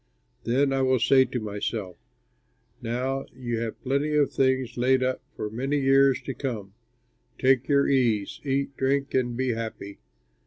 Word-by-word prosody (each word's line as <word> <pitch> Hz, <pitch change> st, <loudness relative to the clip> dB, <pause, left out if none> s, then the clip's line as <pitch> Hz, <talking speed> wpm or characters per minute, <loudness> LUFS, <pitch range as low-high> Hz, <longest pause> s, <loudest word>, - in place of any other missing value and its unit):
Then 135 Hz, +3 st, +2 dB
I 135 Hz, -, +1 dB
will 130 Hz, 0 st, +3 dB
say 130 Hz, +3 st, +4 dB
to 125 Hz, -, -4 dB
myself, 105 Hz, -3 st, -4 dB, 0.9 s
Now 125 Hz, +3 st, -2 dB
you 120 Hz, -3 st, -3 dB
have 115 Hz, -1 st, -4 dB
plenty 140 Hz, +3 st, 0 dB
of 145 Hz, -2 st, +3 dB
things 130 Hz, -2 st, +1 dB
laid 130 Hz, +1 st, +2 dB
up 130 Hz, 0 st, -1 dB
for 105 Hz, -, -4 dB
many 135 Hz, +6 st, -1 dB
years 135 Hz, -1 st, +4 dB
to 135 Hz, -, -4 dB
come; 110 Hz, -8 st, -5 dB, 0.6 s
take 130 Hz, -1 st, +3 dB
your 140 Hz, -1 st, +3 dB
ease, 120 Hz, -7 st, +1 dB
eat, 140 Hz, -1 st, -1 dB
drink 140 Hz, +1 st, 0 dB
and 120 Hz, -2 st, 0 dB
be 130 Hz, 0 st, 0 dB
happy.' 110 Hz, -3 st, -5 dB
130 Hz, 155 wpm, -26 LUFS, 115-135 Hz, 0.9 s, say